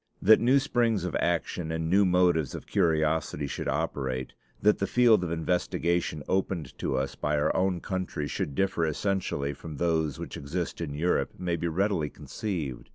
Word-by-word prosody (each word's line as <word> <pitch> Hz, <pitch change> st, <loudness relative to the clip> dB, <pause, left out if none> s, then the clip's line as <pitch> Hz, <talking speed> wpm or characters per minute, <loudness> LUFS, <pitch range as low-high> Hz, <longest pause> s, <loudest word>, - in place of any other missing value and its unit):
That 110 Hz, +3 st, +6 dB
new 125 Hz, +4 st, +4 dB
springs 120 Hz, -7 st, +1 dB
of 90 Hz, -, -3 dB
action 85 Hz, -1 st, -1 dB
and 80 Hz, 0 st, -2 dB
new 100 Hz, +4 st, +4 dB
motives 90 Hz, -5 st, +2 dB
of -, -, -7 dB
curiosity 80 Hz, -2 st, +1 dB
should 70 Hz, -, -4 dB
operate, 65 Hz, -2 st, -2 dB, 0.3 s
that 105 Hz, +1 st, +3 dB
the 100 Hz, -, 0 dB
field 120 Hz, -6 st, +4 dB
of 85 Hz, -, -3 dB
investigation 85 Hz, -1 st, 0 dB
opened 90 Hz, -7 st, -1 dB
to 65 Hz, -, -1 dB
us 70 Hz, +1 st, -1 dB
by 75 Hz, 0 st, -1 dB
our 75 Hz, -, +1 dB
own 90 Hz, -2 st, +1 dB
country 95 Hz, -6 st, -3 dB
should 70 Hz, -, -3 dB
differ 95 Hz, -2 st, +1 dB
essentially 80 Hz, -4 st, -1 dB
from 75 Hz, +1 st, -9 dB
those 80 Hz, -3 st, 0 dB
which -, -, -6 dB
exist 85 Hz, +5 st, -4 dB
in 75 Hz, -4 st, -4 dB
Europe, 85 Hz, +4 st, 0 dB
may 90 Hz, -2 st, -1 dB
be 85 Hz, +1 st, -2 dB
readily 85 Hz, -2 st, 0 dB
conceived. 80 Hz, -, -5 dB
85 Hz, 170 wpm, -28 LUFS, 75-95 Hz, 0.3 s, That